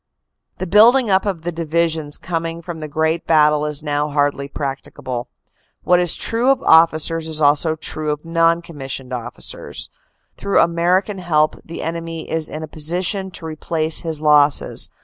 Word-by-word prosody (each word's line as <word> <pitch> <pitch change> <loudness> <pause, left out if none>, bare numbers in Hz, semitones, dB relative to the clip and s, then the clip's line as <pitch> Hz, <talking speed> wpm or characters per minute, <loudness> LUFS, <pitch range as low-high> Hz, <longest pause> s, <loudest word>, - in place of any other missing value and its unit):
The 185 - -4
building 225 +5 +5
up 190 +2 +2
of 180 -5 -3
the 175 - -2
divisions 165 -2 -1
coming 165 -1 -4
from 170 -2 -7
the 155 - -6
great 160 +2 -1
battle 150 -1 +3
is 150 -1 -2
now 145 0 -1
hardly 145 -1 0
practicable. 135 -3 -5 0.6
What 180 0 +4
is 175 -2 +3
true 235 +3 +1
of 270 - +3
officers 160 0 +4
is 155 -1 -1
also 150 +2 +3
true 155 -1 -3
of 150 +1 -3
non 165 0 +2
commissioned 135 -5 -7
officers. 120 -2 -3 0.5
Through 200 - +1
American 180 +4 +1
help 155 -4 +2
the 165 - -7
enemy 165 0 -5
is 160 -1 -1
in 155 +1 -6
a - - -6
position 180 +6 -1
to 180 - -7
replace 160 0 -1
his 160 -2 -4
losses. 150 -1 +3
160 Hz, 160 wpm, -19 LUFS, 150-170 Hz, 0.6 s, building